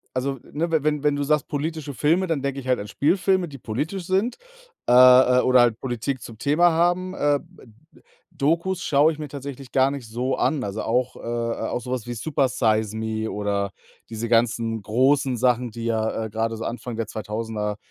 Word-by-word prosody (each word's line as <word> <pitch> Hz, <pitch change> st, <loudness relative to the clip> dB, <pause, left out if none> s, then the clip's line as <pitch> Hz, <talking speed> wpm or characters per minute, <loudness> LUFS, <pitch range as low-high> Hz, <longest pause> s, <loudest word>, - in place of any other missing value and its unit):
also, 135 Hz, +1 st, -1 dB
ne, 165 Hz, +3 st, -1 dB
we 160 Hz, -3 st, +1 dB
wenn 150 Hz, -1 st, 0 dB
wenn 145 Hz, -1 st, +2 dB
du 145 Hz, -, -1 dB
sagst 150 Hz, 0 st, +1 dB
politische 150 Hz, -1 st, -4 dB
Filme, 165 Hz, -, +2 dB
dann 155 Hz, -5 st, -1 dB
denke 140 Hz, 0 st, -2 dB
ich 130 Hz, -, -12 dB
halt 125 Hz, -, +2 dB
an 105 Hz, -, -7 dB
Spielfilme, 180 Hz, +3 st, +1 dB
die 140 Hz, -, -10 dB
politisch 150 Hz, -, -4 dB
sind, 200 Hz, -, 0 dB, 0.5 s
äh, -, -, +4 dB
äh, 125 Hz, 0 st, +7 dB
oder 130 Hz, -1 st, +5 dB
halt 115 Hz, -2 st, +3 dB
Politik 125 Hz, +1 st, -3 dB
zum 110 Hz, -2 st, -10 dB
Thema 155 Hz, +6 st, +3 dB
haben. 175 Hz, +3 st, +1 dB
Äh, 145 Hz, -4 st, +1 dB, 0.5 s
D -, -, -21 dB, 0.3 s
dokus 170 Hz, +4 st, 0 dB
schaue 150 Hz, +1 st, +4 dB
ich 150 Hz, -, -10 dB
mir 150 Hz, -, -5 dB
tatsächlich 140 Hz, -1 st, -8 dB
gar 135 Hz, 0 st, +3 dB
nicht 140 Hz, -4 st, -6 dB
so 125 Hz, +4 st, -2 dB
an. 145 Hz, -5 st, 0 dB
Also, 100 Hz, +2 st, -4 dB
auch 125 Hz, +2 st, 0 dB
äh, -, -, -11 dB
äh, 115 Hz, 0 st, -3 dB
auch -, -, -2 dB
so 125 Hz, -, -8 dB
was 125 Hz, -3 st, -3 dB
wie 120 Hz, -, -4 dB
„Supersize 110 Hz, -5 st, 0 dB
Me“ 110 Hz, 0 st, -2 dB
oder 100 Hz, -1 st, -1 dB, 0.4 s
diese 115 Hz, +1 st, -4 dB
ganzen 115 Hz, -1 st, +1 dB
großen 130 Hz, +4 st, +2 dB
Sachen, 125 Hz, 0 st, +1 dB
die 115 Hz, +1 st, -7 dB
ja, 110 Hz, -1 st, -1 dB
äh, 110 Hz, -, -6 dB
grade 115 Hz, +1 st, -2 dB
so 115 Hz, -, -6 dB
Anfang 120 Hz, 0 st, -5 dB
der 115 Hz, -2 st, -2 dB
2000er, 105 Hz, -1 st, -4 dB
130 Hz, 200 wpm, -23 LUFS, 115-150 Hz, 0.5 s, äh